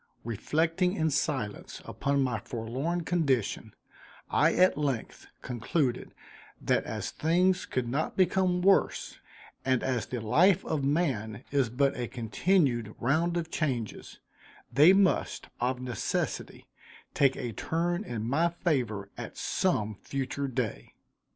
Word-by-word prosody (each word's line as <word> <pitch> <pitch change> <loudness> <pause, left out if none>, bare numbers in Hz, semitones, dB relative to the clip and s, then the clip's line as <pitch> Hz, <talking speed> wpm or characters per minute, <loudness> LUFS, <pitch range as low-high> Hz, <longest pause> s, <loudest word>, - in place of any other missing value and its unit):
Reflecting 165 - 0
in 160 -5 0
silence 135 -7 -2
upon 140 0 0
my 125 -4 -1
forlorn 130 - -3
condition, 150 - 0 0.6
I - - +4
at 185 +1 +5
length 140 -6 -3 0.2
concluded 125 +2 -1 0.4
that - - +1
as - - -4
things 180 +4 +2
could 130 -2 -2
not 140 +6 -2
become 185 -1 +2
worse 195 +1 +2 0.4
and 130 -2 +1
as 125 -3 -1
the 125 - -4
life 165 - +3
of 150 -3 -1
man 130 -8 0
is 135 -4 +2
but 135 +4 +1
a 120 -1 -3
continued 120 - 0
round 165 +7 +1
of 165 -1 -3
changes, 125 -9 -3 0.6
they 150 +8 +8
must, 195 -1 +2
of 125 +1 0
necessity, 125 -2 -3 0.5
take 140 -2 +3
a 120 -2 -4
turn 175 - -1
in 115 - -4
my 160 +7 +2
favor 125 - -1
at - - -7
some 105 0 0
future 140 +1 -3
day. 115 - -4
140 Hz, 125 wpm, -29 LUFS, 120-170 Hz, 0.6 s, they